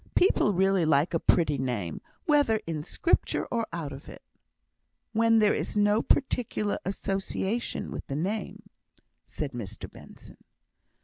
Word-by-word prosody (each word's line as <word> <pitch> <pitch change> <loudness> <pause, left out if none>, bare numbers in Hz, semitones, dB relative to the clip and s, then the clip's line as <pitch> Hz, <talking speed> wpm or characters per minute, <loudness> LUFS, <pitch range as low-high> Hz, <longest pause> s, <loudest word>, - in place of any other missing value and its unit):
People 355 - +4
really 190 -1 +2
like 155 +1 +2
a 165 - +2
pretty 150 -5 +2
name, 115 -11 -3 0.2
whether 290 -8 +3
in 160 -2 -3
Scripture 335 - 0
or 230 -2 0
out 160 -4 -4
of 135 - -10
it." - - -12 0.9
"When 225 0 +4
there 210 -1 +4
is - - -3
no 205 +2 +4
particular 235 -6 0
association 195 +3 -2
with - - -6
the 135 - -3
name," 195 +8 -3 0.6
said 150 -3 -4
Mr 115 -6 -7
Benson. - - -14
195 Hz, 135 wpm, -28 LUFS, 150-220 Hz, 0.9 s, People